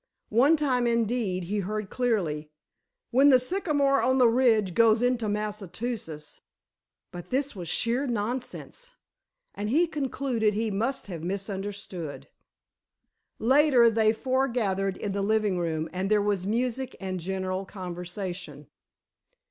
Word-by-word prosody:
One 270 Hz, +9 st, +4 dB
time, 255 Hz, -5 st, +1 dB
indeed, 230 Hz, -5 st, 0 dB
he 205 Hz, +4 st, -2 dB
heard 210 Hz, +1 st, -3 dB
clearly: 175 Hz, -12 st, -1 dB, 0.6 s
"When 270 Hz, +4 st, +6 dB
the 260 Hz, -, +8 dB
Sycamore 285 Hz, -2 st, +1 dB
on 260 Hz, +1 st, +2 dB
the 250 Hz, -2 st, +6 dB
ridge 225 Hz, -6 st, +3 dB
goes 225 Hz, +3 st, +4 dB
into 245 Hz, -3 st, +1 dB
Massachusetts——" 210 Hz, -5 st, -5 dB, 0.7 s
but 175 Hz, -1 st, -9 dB
this 270 Hz, 0 st, -1 dB
was 175 Hz, -4 st, -5 dB
sheer 245 Hz, +4 st, +1 dB
nonsense, 250 Hz, -, -4 dB, 0.6 s
and 210 Hz, +1 st, -4 dB
he 315 Hz, +9 st, +4 dB
concluded 270 Hz, -8 st, -1 dB
he 220 Hz, 0 st, -1 dB
must 230 Hz, +7 st, -1 dB
have 175 Hz, -5 st, -6 dB
misunderstood. 195 Hz, -3 st, -5 dB, 1.1 s
Later, 260 Hz, -1 st, +5 dB
they 220 Hz, -1 st, +3 dB
all 220 Hz, -, -8 dB
forgathered 235 Hz, -8 st, 0 dB
in 205 Hz, -, -3 dB
the 200 Hz, +1 st, -2 dB
living 210 Hz, -2 st, +1 dB
room 160 Hz, -2 st, -1 dB
and 185 Hz, +2 st, -2 dB
there 215 Hz, 0 st, +4 dB
was 200 Hz, -2 st, 0 dB
music 250 Hz, +3 st, -1 dB
and 185 Hz, -1 st, -4 dB
general 190 Hz, +1 st, -3 dB
conversation. 180 Hz, -4 st, -6 dB
215 Hz, 130 wpm, -27 LUFS, 190-250 Hz, 1.1 s, the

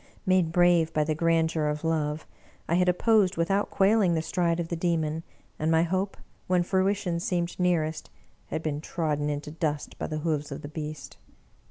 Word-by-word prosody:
Made 185 Hz, -3 st, +3 dB
brave 175 Hz, -2 st, +4 dB
by 155 Hz, -, +2 dB
the 155 Hz, +1 st, 0 dB
grandeur 160 Hz, -1 st, +1 dB
of 150 Hz, +1 st, -2 dB
love, 155 Hz, -1 st, -1 dB, 0.4 s
I -, -, 0 dB
had 180 Hz, +1 st, +3 dB
opposed 200 Hz, 0 st, +3 dB
without 195 Hz, +5 st, +1 dB
quailing 195 Hz, -3 st, +3 dB
the 160 Hz, -, 0 dB
stride 170 Hz, 0 st, 0 dB
of 165 Hz, -1 st, -3 dB
the 170 Hz, -, -1 dB
Demon, 165 Hz, -2 st, 0 dB, 0.4 s
and 155 Hz, -, 0 dB
my 160 Hz, 0 st, +4 dB
hope, 190 Hz, +3 st, -1 dB, 0.3 s
when 180 Hz, -1 st, +3 dB
fruition 190 Hz, -1 st, 0 dB
seemed 175 Hz, 0 st, -2 dB
nearest, 165 Hz, -3 st, 0 dB, 0.4 s
had 160 Hz, -, -4 dB
been 150 Hz, -1 st, -2 dB
trodden 150 Hz, -3 st, -1 dB
into 145 Hz, 0 st, -4 dB
dust 155 Hz, -2 st, -3 dB
by -, -, -2 dB
the 155 Hz, -, -3 dB
hoofs 150 Hz, -3 st, -1 dB
of 140 Hz, +3 st, -6 dB
the 145 Hz, -, -6 dB
beast! 155 Hz, 0 st, -7 dB
165 Hz, 180 wpm, -27 LUFS, 155-180 Hz, 0.4 s, brave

